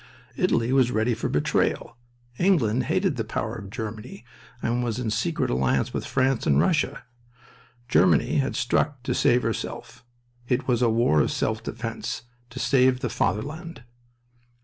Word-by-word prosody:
Italy 115 +3 +1
was 130 -3 +4
ready 115 0 +1
for 115 - -3
betrayal. 75 +9 0 0.4
England 130 - +2
hated 185 -2 0
the 115 - -1
power 110 0 -3
of 105 -5 -8
Germany 110 0 -7 0.3
and 120 +1 -1
was 120 -2 -2
in 120 -4 -2
secret 115 +9 -1
alliance 65 +1 +1
with - - -3
France 135 -2 +1
and 70 -1 +4
Russia. 165 -5 +1 0.8
Germany 150 +5 +3
had 140 -1 0
struck 135 +2 0
to - - -1
save 125 +1 +3
herself. 115 +1 -5 0.4
"It 125 - 0
was 125 -2 +1
a 120 - +4
war 110 -9 +3
of - - 0
self - - -1
defense, - - -5 0.3
to 115 - -12
save 130 -1 +3
the 125 - -1
Fatherland." 145 - -3
120 Hz, 150 wpm, -25 LUFS, 110-135 Hz, 0.8 s, was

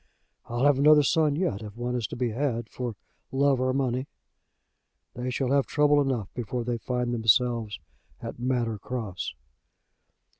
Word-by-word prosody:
I'll 120 +3 0
have 145 -2 +4
another 150 +1 +7
son 155 -1 +2
yet, 150 - -1
if 105 0 -9
one 120 +1 -2
is 120 -4 -1
to - - -7
be 120 -2 -1
had 120 -2 -1
for 120 -3 -4 0.4
love 135 -1 +3
or 130 0 +2
money. 130 0 -1 1.1
They 125 +1 -4
shall 130 +1 -1
have 140 -1 +3
trouble 145 0 +4
enough 125 -8 -2
before 120 0 -3
they 120 0 -2
find 125 -1 -2
themselves 115 -1 +2 0.4
at - - -7
Manor 120 -3 -1
Cross." 110 -6 -5
125 Hz, 155 wpm, -27 LUFS, 115-135 Hz, 1.1 s, another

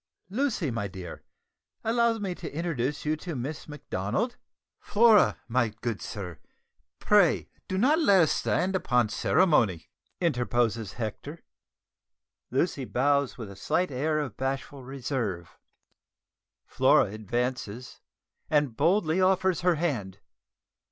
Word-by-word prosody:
Lucy, 215 - 0
my 115 -3 -2
dear, 90 -2 -9 0.6
allow 230 0 +2
me 200 -4 -3
to 175 -2 -7
introduce 145 -4 -2
you 155 +1 +1
to 165 +1 -6
Miss 140 +5 -5
Macdonald 150 - -3 0.2
" - - -65
"Flora, 220 0 +4
my 120 -1 +1
good 110 0 -5
sir; 90 -6 -6 0.6
pray 205 -6 +3 0.2
do 185 - -2
not 280 - +4
let 200 - +5
us 160 - +3
stand 185 +2 0
upon 125 - +2
ceremony," 110 - +2 0.3
interposes 120 - 0
Hector. 125 +8 -6 1.1
Lucy 140 +1 0
bows 140 +2 +1
with 110 -5 -7
a - - -10
slight 180 - 0
air 150 +4 0
of 140 -8 -3
bashful 135 +1 -4
reserve; 125 - -4 1.1
Flora - - +3
advances 120 +2 -4 0.5
and 145 -6 +2
boldly 170 - +2
offers 185 -1 +2
her 180 -1 +3
hand. 130 - -2
140 Hz, 120 wpm, -27 LUFS, 115-180 Hz, 1.1 s, let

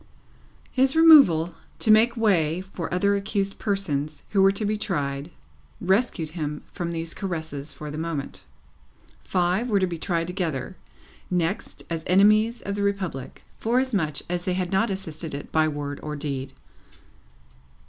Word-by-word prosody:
His 265 +2 +2
removal, 275 - +7 0.2
to 220 - +3
make 230 +3 +5
way 180 -7 +2
for 190 -3 -6
other 200 +3 +2
accused 200 -1 -2
persons 155 -8 -1
who 200 - +2
were 195 0 +6
to 205 +2 -2
be 210 +1 +1
tried, 145 -8 -2 0.5
rescued 190 -4 +1
him 150 -2 -4
from 170 -1 -3
these 165 0 -4
caresses 160 -6 -4
for 150 -1 -8
the 150 - -5
moment. 160 -4 -4 0.8
Five 185 +6 0
were 205 -3 +3
to 190 - +2
be 170 -2 -5
tried 170 -1 -1
together, 170 -5 -3 0.5
next, 180 +2 -2
as 165 -1 -3
enemies 215 +5 +4
of 200 - -3
the 205 - -3
Republic, 195 -9 -3 0.2
forasmuch 225 - 0
as 175 0 -3
they 185 - 0
had 180 -1 -2
not 215 +4 +2
assisted 160 -5 -5
it 145 - -8
by 155 0 +3
word 145 -1 -4
or 150 0 -5
deed. 135 -2 -4
180 Hz, 150 wpm, -25 LUFS, 155-200 Hz, 0.8 s, removal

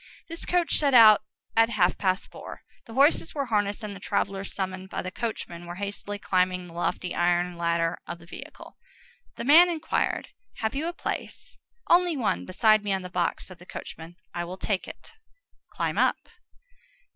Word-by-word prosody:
This 330 0 -5
coach 355 -2 +2
set 280 -3 +3
out 215 -3 +9 0.3
at 225 0 +5
half 185 -6 +2
past 185 0 -1
four. - - -10 0.2
The 225 - -10
horses 285 +5 +3
were 280 -2 -1
harnessed, 205 -2 0
and 205 -1 -5
the - - -9
travellers, 195 0 -2
summoned 190 -1 -4
by - - -4
the 185 - -5
coachman, 175 -6 -5
were 175 - -6
hastily 205 +1 -5
climbing 185 -2 0
the 170 - -13
lofty 175 +1 -2
iron 175 0 +1
ladder 170 -1 0
of 175 - -5
the 170 - -16
vehicle. - - -11 0.6
The - - -5
man 330 +6 +8
inquired:— 325 -2 -1 0.3
"Have 220 -1 -2
you 295 +4 -2
a - - -1
place?" - - -6 0.3
"Only 345 -2 +4
one—beside 215 -2 +2
me 205 - -2
on 190 -1 -1
the 180 - -8
box," 180 -1 -1
said 185 -2 -13
the 175 - -15
coachman. 165 +2 -9 0.2
"I 175 - -2
will 180 +2 -7
take 195 -1 -2
it." - - -11 0.6
"Climb - - -2
up." - - +1
195 Hz, 180 wpm, -26 LUFS, 180-235 Hz, 0.6 s, out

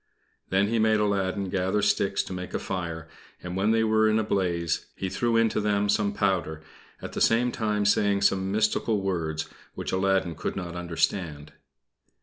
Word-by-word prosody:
Then 95 +2 +2
he 115 0 +1
made 110 0 +3
Aladdin 100 -1 0
gather 95 +2 0
sticks 105 -1 +1
to - - -7
make 90 0 -6
a - - 0
fire, 85 -4 -4 0.4
and 90 0 -5
when 100 +3 +1
they 110 0 +3
were 110 0 +3
in 110 - +2
a 110 - +1
blaze 90 -5 -1
he 95 - -3
threw 115 +3 +1
into 115 -1 +2
them 105 -1 +1
some 105 0 +2
powder, 90 -6 -1 0.4
at - - -6
the - - -4
same 120 +2 +3
time 105 -3 -1
saying 100 -1 +3
some 95 -1 +2
mystical 110 0 +1
words, 80 -5 -2 0.3
which - - -4
Aladdin 95 -2 +1
could 80 - -4
not 90 -2 -5
understand. 85 -3 -2
100 Hz, 175 wpm, -26 LUFS, 90-105 Hz, 0.4 s, made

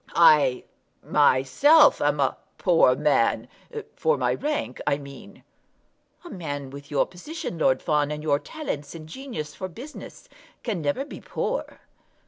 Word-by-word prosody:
I 150 -6 +5 0.4
myself 150 - +5
am 145 0 +1
a 135 - +2 0.2
poor 165 -8 +4
man; 145 -6 +2 0.5
for 475 0 +1
my - - +1
rank 295 - -3
I 140 - +2
mean." 140 -1 -12 0.8
"A - - -8
man 145 -6 -5
with 140 +1 -10
your 145 -2 +2
position, 180 - -7
Lord 130 -4 +2
Fawn, 150 -1 +1
and 150 0 -5
your 145 -2 +2
talents 150 - -6
and 155 -1 -9
genius 200 - -6
for 185 - -5
business, 265 - -11 0.4
can 210 -8 -2
never 150 - -1
be - - -10
poor." - - -4
150 Hz, 140 wpm, -25 LUFS, 145-230 Hz, 0.8 s, I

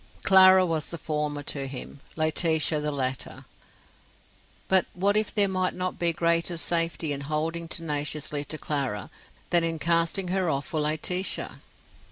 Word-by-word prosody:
Clara 190 -1 +7
was 160 -3 -2
the 170 - -6
former 150 -2 -3
to 140 -1 -3
him, 135 +1 -8 0.2
Laetitia 155 -1 +1
the 150 0 -2
latter. 130 -2 -3 1.2
But 190 -2 +4
what 200 +3 +2
if 215 0 +1
there 205 -2 +3
might 185 -1 -1
not 185 0 -3
be 170 -1 +2
greater 170 +1 0
safety 165 -1 0
in 140 - -5
holding 160 +3 -3
tenaciously 150 -2 -2
to 155 - -6
Clara 135 -11 -3 0.4
than 175 -1 +4
in 165 -1 -1
casting 170 +3 +1
her 185 -2 0
off 140 -2 -1
for 155 - -3
Laetitia? 155 +5 -1
165 Hz, 150 wpm, -26 LUFS, 150-180 Hz, 1.2 s, Clara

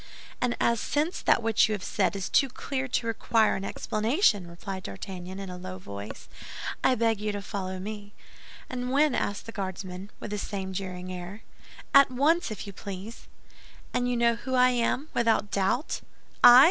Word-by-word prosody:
"And 245 -1 +1
as 235 -1 +3
since 310 +5 0
that - - +3
which 225 -1 +4
you - - +1
have 200 -3 -4
said - - +1
is 195 -1 -2
too 275 - +3
clear 265 +1 -3
to 245 - 0
require 225 -1 +2
any 195 +1 -4
explanation," 220 - +1
replied 190 +3 -6
D'Artagnan, 185 - -7
in 195 -2 -6
a 180 - -7
low 185 0 -6
voice, 100 - -8 0.6
"I 260 - +4
beg 225 -2 +1
you 210 0 0
to 205 - -3
follow 190 -3 -4
me." 205 +1 -7 0.5
"And 250 0 -3
when?" 290 +1 +4
asked 205 -3 -1
the 230 - -7
Guardsman, 190 -1 -5
with 210 - -6
the 210 - -2
same 190 -2 -4
jeering 185 -1 -5
air. 180 +4 -7 0.5
"At 275 0 +8
once, 295 +7 +2
if 215 - -6
you 200 - -8
please." 200 +4 -8 0.7
"And 245 0 +1
you 245 - 0
know 235 0 +4
who 260 +2 -3
I 250 0 +6
am, 250 +5 0
without 225 -3 +2
doubt?" 200 - 0 0.4
"I? 245 +1 +11
210 Hz, 185 wpm, -28 LUFS, 190-245 Hz, 0.7 s, I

